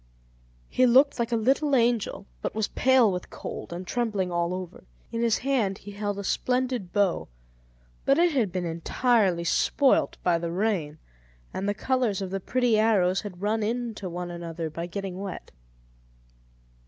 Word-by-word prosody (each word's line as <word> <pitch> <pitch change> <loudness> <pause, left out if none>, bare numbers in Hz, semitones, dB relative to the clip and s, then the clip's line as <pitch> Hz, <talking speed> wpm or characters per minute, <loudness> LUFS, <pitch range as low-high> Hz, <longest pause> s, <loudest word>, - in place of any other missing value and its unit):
He 255 - +3
looked 265 +3 +5
like 235 0 -1
a - - +2
little 270 +5 +2
angel, 235 -3 +1 0.2
but - - -3
was 220 -2 0
pale 255 -5 +4
with 180 -1 -5
cold, - - -7
and 175 +2 -5
trembling 210 -5 -1
all 170 0 0
over. 185 -1 -6 0.3
In 230 - -2
his 230 -2 +3
hand 240 -8 0
he 205 - -10
held 205 0 -3
a 200 - -4
splendid 250 -3 -1
bow, 200 -4 +1 0.8
but 275 - +3
it 345 +1 +4
had 240 - +1
been 180 0 -2
entirely 180 +2 +1
spoilt 270 +10 +2
by 175 -2 +2
the 170 0 -3
rain, 175 -6 -1 0.6
and 195 +2 -2
the 205 - 0
colours 245 -3 0
of 190 -2 -4
the 195 - -2
pretty 240 +2 +1
arrows 195 -4 +3
had 195 -2 -8
run 220 +2 +1
into 225 -3 -3
one 175 0 -5
another 165 -2 -5
by 170 +2 -5
getting 190 0 -5
wet. 195 -2 -6
205 Hz, 165 wpm, -26 LUFS, 180-240 Hz, 0.8 s, looked